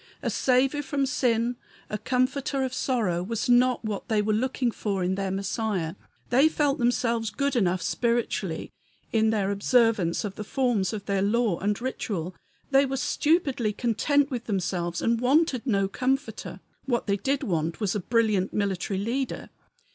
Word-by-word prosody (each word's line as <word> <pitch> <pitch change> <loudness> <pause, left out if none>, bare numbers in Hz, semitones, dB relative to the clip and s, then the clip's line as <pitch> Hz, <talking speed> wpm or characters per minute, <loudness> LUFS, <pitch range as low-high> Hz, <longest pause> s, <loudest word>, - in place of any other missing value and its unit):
A - - 0
Saviour 265 +3 +2
from 280 -1 -1
sin, 240 -2 +1 0.3
a 210 - -4
Comforter 260 +3 0
of 260 -1 -2
sorrow, 220 -11 0
was 225 +4 -2
not 245 -1 +3
what 210 -2 -4
they 220 -2 +1
were 210 +1 +1
looking 250 +2 0
for 200 -4 -2
in 180 +1 0
their 195 0 -2
Messiah. 195 -3 -2 0.4
They 270 +6 +5
felt 290 -2 0
themselves 235 -2 +1
good 280 +6 -1
enough 185 -5 +1
spiritually, 230 -8 -1 0.4
in 220 -1 +3
their 205 -3 +1
observance 200 -4 +2
of 200 - -4
the 215 - -4
forms 235 -5 0
of 210 -3 -5
their 200 -1 0
law 210 -2 +1
and 205 +1 0
ritual; 200 -8 -3 0.4
they 270 0 +6
were 270 -1 -2
stupidly 270 -5 +1
content 280 +6 +1
with 245 -2 -3
themselves 175 -4 -2
and 230 0 +1
wanted 270 -1 +2
no 195 -4 +2
comforter. 260 +7 -2 0.3
What 240 -3 0
they 200 -1 +1
did 275 +6 -1
want 165 -3 -1
was 205 -4 0
a 210 - -1
brilliant 215 -2 +1
military 195 -1 -1
leader. 240 +7 -3
230 Hz, 160 wpm, -26 LUFS, 200-255 Hz, 0.4 s, they